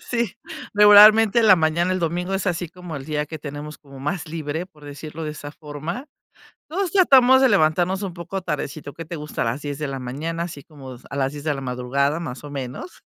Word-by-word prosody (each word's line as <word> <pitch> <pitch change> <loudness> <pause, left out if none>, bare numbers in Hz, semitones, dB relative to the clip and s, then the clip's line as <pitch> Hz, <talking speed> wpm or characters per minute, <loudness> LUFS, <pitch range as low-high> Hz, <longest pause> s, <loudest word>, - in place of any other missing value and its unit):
sí, 235 -5 -2 0.4
regularmente 210 +2 +8
en 225 - +4
la 190 - +8
mañana, 165 +2 +1
el 185 - 0
domingo 175 +2 -2
es 195 +1 -2
así 175 -2 -1
como 180 -1 -9
el 140 -2 -6
día 150 0 -2
que 160 +1 -7
tenemos 150 +1 -7
como 140 -2 -14
más 160 +4 -3
libre, 160 +1 -4
por 150 -5 -19
decirlo 150 +2 -8
de 155 - -3
esa 145 -1 -8
forma. 155 - -7 0.6
Todos 365 +2 -2
tratamos 260 -9 +6
de 265 - +5
levantarnos 180 0 +2
un 195 -3 -4
poco 175 +3 -5
tardecito. 150 -3 -5
Que 165 - -8
te 170 - -6
gusta 150 -1 -4
a - - -2
las 120 +5 -2
10 145 -1 -5
de 150 0 -3
la 135 -1 -5
mañana, 155 +7 -4
así 155 -5 -8
como, 135 -4 -11
a - - -7
las 135 0 0
10 145 - -8
de 150 -1 0
la 135 - -6
madrugada, 135 +4 -1
más 150 -6 -6
o 145 - -8
menos. 135 - -7
155 Hz, 225 wpm, -22 LUFS, 145-185 Hz, 0.6 s, regularmente